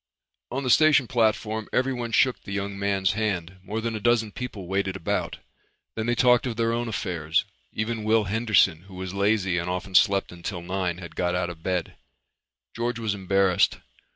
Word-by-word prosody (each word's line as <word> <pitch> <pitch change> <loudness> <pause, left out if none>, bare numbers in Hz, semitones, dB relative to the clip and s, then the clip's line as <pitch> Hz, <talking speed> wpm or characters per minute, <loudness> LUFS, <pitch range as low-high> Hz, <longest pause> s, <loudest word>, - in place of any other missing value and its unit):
On 135 +3 -3
the 130 - +1
station 155 -2 +5
platform 110 -2 0
everyone 125 -2 -1
shook 130 +2 +3
the - - -9
young 100 0 -3
man's 100 -1 +1
hand. 95 -5 -2
More 105 +3 -4
than 115 0 -2
a - - -3
dozen 115 -1 +2
people 110 -5 -6
waited 95 +1 -1
about. 95 - -2 0.6
Then 110 +1 -2
they 120 - +2
talked 125 0 +4
of 120 - -3
their 115 0 +1
own 120 +1 -1
affairs. 85 -6 -1 0.3
Even 110 0 -3
Will 110 0 +3
Henderson, 100 -5 +2
who 95 - -12
was 95 0 -5
lazy 100 -3 +1
and 85 +1 -3
often 90 +2 -4
slept 100 0 +4
until 85 0 -6
nine, 90 -1 -2
had 85 -3 -10
got 90 0 0
out 90 -1 -1
of 80 -2 -12
bed. 90 -1 -2 0.8
George 120 0 -2
was 110 -3 -1
embarrassed. 95 -1 +2
100 Hz, 180 wpm, -25 LUFS, 90-115 Hz, 0.8 s, station